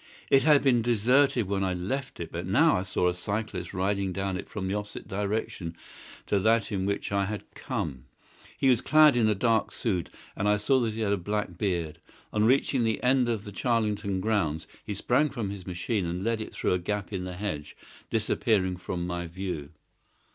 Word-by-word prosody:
It 135 - +7
had 150 -2 +5
been 125 -4 +4
deserted 120 +1 +3
when 95 0 0
I 95 -1 0
left 130 +10 -4
it, 85 - -5
but 85 +1 -4
now 145 - +4
I - - +1
saw 95 -1 0
a 90 - +2
cyclist 100 -1 -3
riding 95 0 0
down 95 0 -2
it - - -6
from 100 -3 -4
the 95 - -1
opposite 105 0 -5
direction 100 -4 -3 0.5
to 100 - +1
that 110 +2 +2
in 95 -1 -1
which 100 0 -2
I 100 0 +2
had 105 +1 -4
come. 65 -2 -4 0.5
He 135 - +2
was 125 -3 +4
clad 155 -2 +6
in 115 -3 +3
a 105 - +2
dark 115 +2 +2
suit, 95 -9 -2 0.3
and 105 +2 0
I 105 - +4
saw 130 +6 +3
that 115 -3 -1
he 115 - -3
had 100 -2 +2
a - - +1
black 105 0 -2
beard. 85 -5 -2 0.3
On 105 0 +3
reaching 130 +1 +3
the 110 -1 0
end 125 -1 +3
of 110 -3 -1
the 105 - -8
Charlington 105 -4 0
grounds 90 -8 0 0.2
he 105 - -4
sprang 130 +9 +2
from 115 -8 -3
his 95 -2 -8
machine 90 +2 -1
and 90 +2 -3
led 115 0 0
it - - -6
through - - 0
a 90 - +1
gap 105 +2 -3
in 95 -2 -2
the 90 -1 -5
hedge, 85 -7 -5 0.3
disappearing 95 -5 +1
from 90 -1 -4
my 90 -1 -3
view. 85 -5 -5
100 Hz, 205 wpm, -28 LUFS, 90-115 Hz, 0.5 s, It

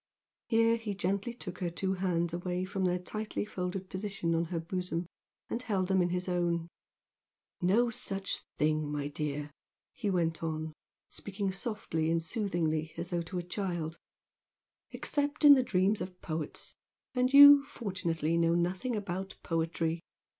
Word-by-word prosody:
Here 230 0 +4
he 220 -3 -4
gently 200 +4 -1
took 185 -7 -8
her 180 -2 -1
two 190 +3 -1
hands 175 -3 0
away 180 +1 -2
from 190 0 -2
their 180 0 +2
tightly 215 +4 -4
folded 185 -1 -4
position 190 -3 -2
on 165 +1 +1
her 170 0 -3
bosom 180 0 -3 0.4
and 235 - -3
held 195 -6 -1
them 190 -1 +4
in 175 - +2
his 180 +1 -1
own. 170 -2 0 0.9
"No 225 +7 +3
such 195 -3 -1 0.2
thing, 155 0 +1
my 145 -1 -2
dear!" 150 0 -3 0.4
he 210 - -2
went 165 -4 0
on, 160 -1 -3 0.4
speaking 200 -1 -3
softly 190 -7 -2
and 165 0 +1
soothingly, 165 -5 -1
as 170 +1 -4
though 175 -1 0
to 170 +2 -5
a 175 - -2
child 175 -3 -3 0.9
"Except 290 +1 -1
in 290 - +12
the 265 - +5
dreams 200 -2 +1
of 180 0 -6
poets, 155 -2 -4 0.4
and 250 0 +2
you 285 0 +10
fortunately! 170 - -2
know 165 0 +3
nothing 185 +8 0
about 190 -2 -4
poetry! 165 0 -1
180 Hz, 155 wpm, -31 LUFS, 165-200 Hz, 0.9 s, in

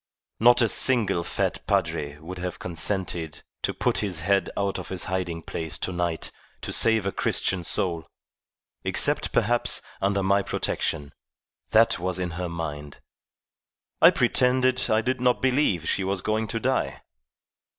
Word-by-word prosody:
Not 120 +2 +6
a - - +4
single 105 -7 +3
fat - - -2
padre 75 0 -1
would 90 +4 -9
have 90 -1 -4
consented 85 -2 -3 0.2
to - - 0
put - - 0
his 95 -7 -2
head 100 +3 +1
out 100 -1 -1
of - - -8
his 95 -2 0
hiding 90 -3 -3
place 80 -1 -4
to - - -2
night 85 -2 -2 0.3
to - - -4
save 110 -3 +4
a 100 - 0
Christian 95 -1 -1
soul, 85 -1 0 0.8
except, - - +2
perhaps, 120 +3 +2 0.2
under 100 0 +1
my 100 +1 +3
protection. 75 -6 -2 0.6
That 115 -4 +4
was 90 0 -1
in 90 -2 -3
her 90 +1 -4
mind. 75 -4 -6 1.0
I - - +10
pretended 130 0 +2
I 110 0 +3
did 130 +1 -2
not 125 -1 +2
believe 125 - +1
she 100 - 0
was 95 -1 -2
going 110 +1 -1
to 115 - -3
die. 90 - -1
95 Hz, 150 wpm, -25 LUFS, 85-110 Hz, 1.0 s, I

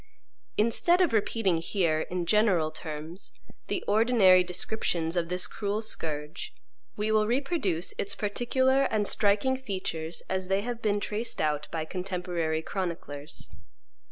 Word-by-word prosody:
Instead 235 - +4
of 355 -9 +3
repeating 210 -4 +2
here, 165 -2 +1
in 180 -1 -2
general 185 -6 +3
terms, 155 +3 -6 0.3
the 360 - -2
ordinary 205 -4 +5
descriptions 180 -2 -1
of 170 -1 0
this 180 0 +1
cruel 205 0 -2
scourge, 155 -8 -3 0.4
we 210 +1 0
will 215 -1 +3
reproduce 240 - 0
its 200 0 -1
particular 260 +6 +2
and 215 -5 +1
striking 215 +5 +2
features 185 -9 -4
as 190 -1 -2
they 195 +1 +1
have 240 +1 -4
been 205 -2 +1
traced 220 +3 -3
out 150 -1 0
by 160 -1 -2
contemporary 175 -3 -2
chroniclers. 165 -7 -4
195 Hz, 130 wpm, -28 LUFS, 165-220 Hz, 0.4 s, ordinary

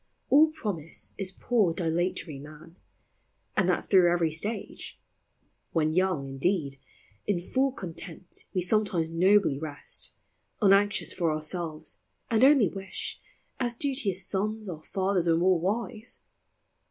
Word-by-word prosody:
All 300 +3 +7
promise 200 - -4
is 190 -2 -1
poor 195 -4 +1
dilatory 165 -3 -1
man, 155 +3 -12 0.8
And 185 -2 +2
that 180 - +1
through 180 -3 +5
every 170 -2 +2
stage. 205 +7 -4 0.7
When 155 -1 +2
young, 180 -6 +1
in 135 0 -7
deed, 150 -5 0 0.5
In 200 -4 +1
full 265 +9 +1
content 180 -3 -6
we 185 - 0
sometimes 180 -4 +1
nobly 185 -4 +4
rest, 150 -2 -4 0.4
Unanxious 200 0 +3
for 170 -3 +1
ourselves, 155 0 -4 0.3
and 225 +1 +4
only 270 -6 +7
wish, 195 -1 -6 0.4
As 240 -2 -1
duteous 230 -9 0
sous, 215 +3 -2
our 165 -4 -6
fathers 190 -1 0
were 165 -1 +4
more 180 0 +3
wise. 215 +5 -3
185 Hz, 130 wpm, -28 LUFS, 165-205 Hz, 0.8 s, All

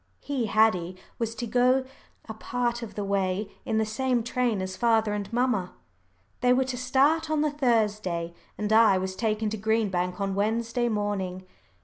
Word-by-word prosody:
He 265 -6 -2
Haddie 195 -5 +2 0.2
was 230 -1 -2
to 235 - -4
go 250 +3 +3 0.4
a 220 - -5
part 240 +2 -2
of 220 -3 -8
the 205 - -3
way 195 0 -1
in 220 - 0
the 220 - +2
same 245 +2 0
train 240 -2 0
as 185 0 -4
father 225 -3 +2
and 205 0 -4
mamma. 230 -6 0 0.7
They 250 0 +4
were 260 +1 +3
to 260 -1 -4
start 280 +6 +2
on 310 -1 +1
the 305 -1 +1
Thursday, 210 - 0 0.2
and 210 0 -1
I 220 -3 +6
was 185 0 -3
taken 215 0 -1
to 220 - -3
Green 220 +1 +1
Bank 180 0 -2
on 195 -1 -1
Wednesday 230 +4 0
morning. 195 -4 -2
220 Hz, 175 wpm, -27 LUFS, 200-245 Hz, 0.7 s, I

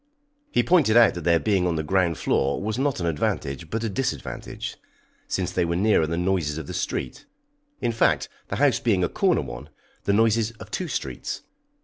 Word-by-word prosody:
He - - +2
pointed 155 -11 +4
out 115 -3 +7
that 85 -2 -6
their 85 -1 +4
being 95 -3 +1
on 85 - 0
the 80 - -1
ground 85 0 +1
floor 70 +1 +1
was 110 +4 -2
not 140 -4 0
an 85 - -2
advantage, 75 -1 -2
but 115 +4 -2
a - - 0
disadvantage, 125 +5 -4 0.5
since - - -1
they - - +1
were 85 0 0
nearer 95 -4 +3
the 85 +1 -2
noises 90 -4 0
of 80 - -5
the - - -7
street 65 - -3 0.5
in 120 - +1
fact, 115 - +2 0.2
the - - -3
house 135 +2 +3
being 100 -6 +2
a 85 - +1
corner - - +2
one, - - -8 0.4
the 100 - +2
noises 115 +1 +3
of 110 - -12
two 185 - -2
streets. - - -4
95 Hz, 200 wpm, -25 LUFS, 85-115 Hz, 0.5 s, out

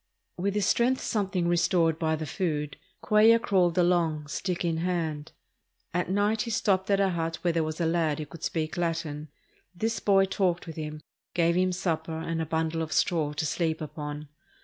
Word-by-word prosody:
With 195 +3 -1
his 205 -2 +1
strength 245 +6 +2
something 190 -5 -1
restored 170 -2 +2
by 160 -1 +1
the 155 0 -4
food, 150 -2 -2 0.3
Cuellar 220 +2 +6
crawled 185 -5 +2
along, 170 -4 +2
stick 180 +2 -2
in 165 -1 0
hand. 165 -4 -2 0.6
At 180 0 -1
night 205 +3 +1
he 235 - -3
stopped 195 -4 +1
at 200 -1 +3
a 195 -1 +3
hut 165 -1 -2
where 175 -1 +2
there 165 -1 +1
was 155 +1 -4
a 170 - +1
lad 160 -3 +1
who 155 - -4
could 150 +3 -12
speak 160 +1 -2
Latin. 160 -3 -2 0.5
This 225 +5 -1
boy 195 -1 +4
talked 185 -2 0
with 165 -2 -8
him, 155 -1 -6 0.3
gave 170 -1 +3
him 185 0 +2
supper 165 -3 -2
and 165 0 -2
a 160 - -3
bundle 160 +1 -1
of 160 -1 -4
straw 155 -5 +1
to 155 +2 -2
sleep 160 +1 -1
upon. 150 0 -6
170 Hz, 190 wpm, -28 LUFS, 160-185 Hz, 0.6 s, Cuellar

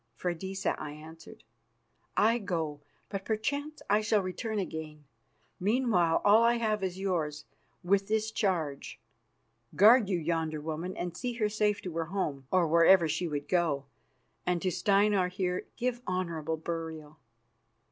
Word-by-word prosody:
"Freydisa," 185 +6 -2
I 145 - -6
answered, 160 -1 -13 0.7
"I 230 +3 +4
go, 160 -7 -3 0.3
but 195 -1 -4
perchance 285 +8 -3
I 210 +1 +3
shall 215 -2 +2
return 215 +4 -3
again. 160 -5 -5 0.6
Meanwhile, 195 -5 +2
all 210 +2 +7
I 235 +1 +4
have 215 -3 0
is 185 -1 -2
yours, 160 -6 -2 0.4
with 195 +2 +2
this 220 0 0
charge. 165 -12 -2 0.8
Guard 220 +1 +6
you 185 - +1
yonder 160 -1 -1
woman, 160 +4 -5
and 175 -1 -4
see 245 +8 -3
her 220 -3 0
safe 210 -1 0
to 180 - -5
her 165 - 0
home, 155 -7 -3
or 185 -3 +3
wherever 170 +2 +6
she 165 +3 -1
would 145 -2 -4
go, 160 -6 +1 0.6
and 180 -1 0
to 185 - +1
Steinar 200 0 +3
here 180 0 -2
give 245 0 -1
honourable 165 -4 -2
burial." 160 -2 -6
180 Hz, 145 wpm, -30 LUFS, 160-210 Hz, 0.8 s, all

